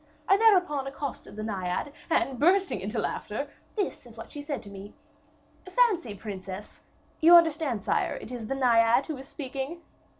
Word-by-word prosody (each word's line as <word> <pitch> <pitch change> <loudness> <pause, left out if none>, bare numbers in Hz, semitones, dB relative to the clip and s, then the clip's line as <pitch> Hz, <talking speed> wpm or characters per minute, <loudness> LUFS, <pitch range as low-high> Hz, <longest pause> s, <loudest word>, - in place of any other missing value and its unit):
I 390 - +6
thereupon 365 -10 +3
accosted 275 -5 -6
the 215 - -5
Naiad, 195 +5 -3 0.2
and 265 -5 +1
bursting 370 - +3
into 210 +5 -4
laughter, 225 +5 -3 0.2
this 400 - -3
is 230 -1 -15
what 225 - -9
she 290 - -7
said 290 0 -4
to 205 - -11
me: 200 +1 -10 0.7
"'Fancy, 370 - +2
princess...' 195 -1 -8 0.4
You 335 +2 +8
understand, 315 - +3
sire, - - 0
it 230 - -8
is 235 -3 -5
the 270 - -2
Naiad 240 0 +4
who 310 -4 -5
is 265 +1 -10
speaking?" 275 +5 -6
270 Hz, 165 wpm, -28 LUFS, 220-325 Hz, 0.7 s, You